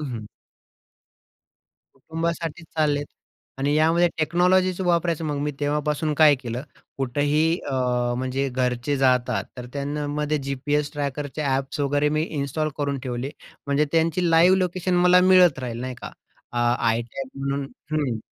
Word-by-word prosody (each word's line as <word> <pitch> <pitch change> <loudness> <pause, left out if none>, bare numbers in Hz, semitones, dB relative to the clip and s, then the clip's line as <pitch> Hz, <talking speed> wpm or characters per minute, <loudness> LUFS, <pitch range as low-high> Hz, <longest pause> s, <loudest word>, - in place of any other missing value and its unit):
हं, 135 - -5
हं. 110 -2 -6 1.7
कुटुंबासाठीच 165 +3 -4
चाललेत. 145 -2 +1 0.5
आणि 140 +2 +1
यामध्ये 165 +3 +4
टेक्नॉलॉजीच 180 +3 +2
वापरायचं. 170 -2 +1
मग 145 -2 -2
मी 150 - -1
तेव्हापासून 150 +1 0
काय 150 -2 +7
केलं, 125 -1 -5 0.4
कुठेही 145 +5 +1
अ, - - -3 0.4
म्हणजे 130 +2 -1
घरचे 125 +2 -1
जातात, 125 -6 +2
तर 125 0 -7
त्यानं 145 +1 -3
मध्ये 150 0 0
जी-पी-एस 145 +2 -1
ट्रॅकरचे 145 +1 -3
ॲप्स 135 0 -1
वगैरे 145 +1 +2
मी 155 - +2
इन्स्टॉल 155 -1 -2
करून 140 -1 -1
ठेवले. 125 +1 -3 0.4
म्हणजे 140 +2 +2
त्यांची 165 +2 +2
लाईव्ह 175 +3 +6
लोकेशन 185 0 -1
मला 180 +1 +5
मिळत 180 -6 +6
राहील, 120 -3 -5
नाही 130 0 -4
का? - - -6 0.4
अ, 120 - -2 0.4
iTag 120 +3 -5
म्हणून 140 0 -2 0.3
हं, 140 -7 0
145 Hz, 140 wpm, -24 LUFS, 135-165 Hz, 1.7 s, काय